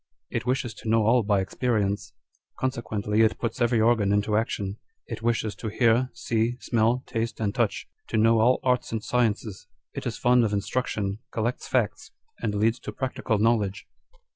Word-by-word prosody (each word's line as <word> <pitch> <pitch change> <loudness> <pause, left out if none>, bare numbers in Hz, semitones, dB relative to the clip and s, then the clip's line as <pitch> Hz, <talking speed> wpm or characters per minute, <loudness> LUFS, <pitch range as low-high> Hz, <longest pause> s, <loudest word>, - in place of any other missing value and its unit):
It - - -3
wishes 125 -2 0
to 110 - -7
know 110 -1 +3
all 120 +3 +5
by 100 -2 +2
experience; 100 -3 -1 0.5
consequently 110 -4 -1
it 110 -1 +3
puts 115 +1 -3
every 120 -1 +3
organ 110 -3 +3
into 105 +1 +1
action: 105 -2 -1 0.3
it 115 -1 -6
wishes 115 -2 0
to 110 - -5
hear, 120 +3 +2
see, 115 +1 0
smell, 120 +2 +1
taste, 115 0 -3
and 105 -2 -1
touch; - - -1 0.2
to - - -1
know 115 +1 +4
all 120 +3 +4
arts 125 -1 +1
and 110 -2 -3
sciences; 110 -4 -1 0.3
it - - -4
is 115 - -3
fond 125 0 +4
of 105 -2 0
instrac 125 +5 -1
tion, 100 0 -3
collects 115 +2 -2
facts, 120 -6 0 0.3
and 105 -2 -1
leads 115 +4 +2
to - - -6
practical 130 -4 -2
knowledge." 105 -3 +1
115 Hz, 175 wpm, -26 LUFS, 105-120 Hz, 0.5 s, all